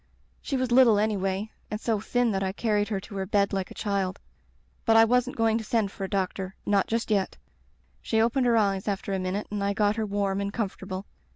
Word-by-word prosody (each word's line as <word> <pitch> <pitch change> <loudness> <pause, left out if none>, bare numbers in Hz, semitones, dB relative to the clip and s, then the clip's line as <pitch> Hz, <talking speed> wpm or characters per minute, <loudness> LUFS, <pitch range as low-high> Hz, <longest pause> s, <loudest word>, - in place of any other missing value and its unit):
She 275 - -2
was 255 -1 -1
little 240 -4 +6
anyway, 205 0 0 0.2
and 210 - -3
so 225 -2 0
thin 245 +2 +1
that 195 -1 -1
I 190 -1 -1
carried 210 -1 0
her 200 -2 -2
to 200 - -10
her 190 -1 -2
bed 200 0 +2
like 190 -2 -2
a - - -11
child. 195 -2 -1 0.6
But 225 -1 +4
I 225 - +8
wasn't 250 +2 +1
going 225 0 +2
to - - -6
send 220 -4 0
for 195 - -7
a 190 - -3
doc 190 -2 0
tor 190 0 -6
— - - -39
^not 200 -2 +3
just 225 -1 -1
yet. 195 -3 0 0.6
She 220 - 0
opened 240 +3 +2
her 235 -1 +4
eyes 195 -2 +1
after 200 +1 -2
a 190 - 0
minute 185 +3 -2
and 205 -1 -2
I 200 0 +1
got 205 +1 +1
her 220 - 0
warm 200 -1 -1
and 200 0 -2
comfort 200 -3 -4
able. 190 0 -5
205 Hz, 245 wpm, -27 LUFS, 195-225 Hz, 0.6 s, I